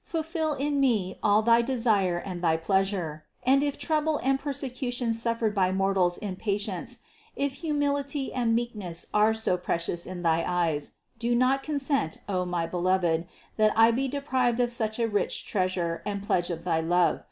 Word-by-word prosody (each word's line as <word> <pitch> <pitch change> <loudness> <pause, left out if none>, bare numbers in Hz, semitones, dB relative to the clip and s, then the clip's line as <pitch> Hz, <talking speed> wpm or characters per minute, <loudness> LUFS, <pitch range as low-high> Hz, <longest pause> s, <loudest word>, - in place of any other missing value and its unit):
Fulfill 320 -1 -2
in 285 +1 -1
me 215 -9 +1
all 210 +1 +3
thy 230 +1 +5
desire 225 -8 +1
and 175 0 -6
thy 160 -1 +3
pleasure; 180 -3 -1 0.2
and 270 +2 +4
if 285 -1 -1
trouble 310 -1 0
and 270 0 +2
persecutions 250 -4 -2
suffered 230 -2 0
by 185 -2 +2
mortals 190 -2 +1
in 195 -3 -5
patience, 205 +3 -3 0.3
if 280 -1 -1
humility 285 -3 -1
and 235 -3 +1
meekness 210 -8 -3
are 215 +1 +4
so 220 -5 +1
precious 170 -1 -2
in 180 -1 -6
thy 165 0 +2
eyes, 165 -5 -1 0.3
do 240 +1 +1
not 255 +3 +3
consent, 275 - -1
O 185 -2 -1
my 175 -2 -1
Beloved, 175 -1 0 0.3
that 215 -1 +4
I 225 +1 +7
be 265 +4 0
de 280 +2 -3
prived 250 -3 +1
of 240 -1 +2
such 220 -3 -1
a 230 -1 +1
rich 205 -2 -1
treasure 185 -4 -1
and 200 -1 -4
pledge 175 -3 0
of 170 -1 -4
thy 165 -2 +1
love. 175 +1 +2
215 Hz, 175 wpm, -27 LUFS, 180-260 Hz, 0.3 s, I